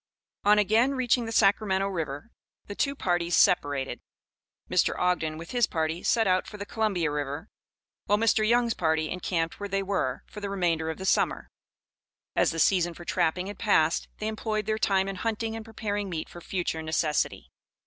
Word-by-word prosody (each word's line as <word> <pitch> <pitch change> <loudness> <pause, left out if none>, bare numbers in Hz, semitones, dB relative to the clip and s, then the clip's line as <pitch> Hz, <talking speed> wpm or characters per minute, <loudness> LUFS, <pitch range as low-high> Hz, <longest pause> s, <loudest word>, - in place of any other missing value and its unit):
On 210 +1 +5
again 225 +6 +3
reaching 245 -2 +1
the - - -4
Sacramento 195 -2 +3
River, 165 +1 -4 0.3
the 205 - -7
two 280 +7 0
parties 175 -7 0
separated. 145 -6 +2 0.7
Mr. - - +2
Ogden, 170 -3 0
with 165 +1 -9
his 240 -3 +2
party, 160 +1 -2
set 225 -2 +2
out 185 -1 +2
for 210 - -9
the 200 - -5
Columbia 200 -8 0
River, 145 +5 -4 0.6
while 205 - +3
Mr. 225 0 +3
Young's 235 +1 +3
party 160 -3 0
encamped 170 -2 -2
where 205 0 -5
they 195 0 0
were, 185 -10 -1
for 210 - -10
the 200 -1 -4
remainder 170 -5 0
of 160 - -4
the 190 - -6
summer. - - +1 0.8
As - - +3
the 165 - -4
season 175 0 +2
for 175 - -11
trapping 180 +1 0
had 200 0 -7
passed, 170 -7 +2
they 215 - -3
employed 215 -1 -2
their 215 0 -1
time 195 -2 +2
in 195 -1 -4
hunting 225 +2 -2
and 225 - -6
preparing 205 -2 -3
meat 160 -3 -4
for 175 - -11
future 175 -3 -2
necessity. 160 -1 -1
190 Hz, 180 wpm, -27 LUFS, 165-215 Hz, 0.8 s, On